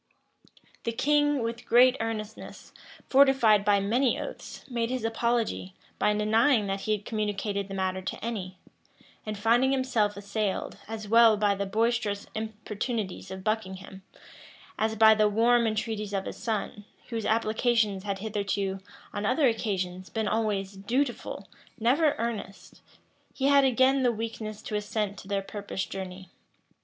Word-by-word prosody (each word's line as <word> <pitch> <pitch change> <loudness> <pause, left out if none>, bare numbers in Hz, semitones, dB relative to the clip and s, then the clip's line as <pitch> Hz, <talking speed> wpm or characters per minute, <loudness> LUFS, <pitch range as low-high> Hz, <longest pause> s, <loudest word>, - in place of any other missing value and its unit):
The 230 - -1
king, 290 +1 +2
with 230 0 -5
great 250 +2 +6
earnestness, 220 -2 -6 0.3
fortified 265 -7 +5
by 205 -1 +4
many 235 +6 +1
oaths, - - -8
made 235 -2 -1
his 255 -3 -2
apology, 225 -4 -1 0.2
by - - +3
denying 220 +3 +3
that 195 0 -2
he 215 - 0
had 210 -1 -4
communicated 205 -2 -2
the 195 - -6
matter 185 0 -1
to 190 - -5
any; 190 -5 -4 0.7
and 215 -1 -3
finding 235 +5 +3
himself 240 -6 +1
assailed, 200 0 -3
as 220 -1 -6
well 225 0 +6
by 205 -1 +2
the 200 0 -3
boisterous 220 -1 0
importunities 215 -2 -4
of 190 0 -7
Buckingham, 190 -3 -3 0.8
as 220 0 +1
by 220 0 +7
the 215 -1 +3
warm 235 +2 +3
entreaties 215 -1 -2
of 195 -1 -1
his - - -6
son, 215 -2 -3 0.3
whose 230 -2 -3
applications 220 -2 +1
had 200 0 -3
hitherto, 200 -2 -2 0.3
on 205 - -3
other 260 +6 +3
occasions, 185 -5 -2
been 220 -2 -2
always 205 -3 -1
dutiful, 240 +6 -2 0.3
never 285 +6 +3
earnest, 220 -4 -5 0.5
he 270 - -1
had 280 -1 +6
again 265 +1 +3
the 250 -2 +3
weakness 220 -1 -5
to - - -7
assent 210 -1 -2
to - - -12
their 200 -1 -1
purposed 200 -1 -5
journey. 190 -1 -7
215 Hz, 145 wpm, -28 LUFS, 200-235 Hz, 0.8 s, by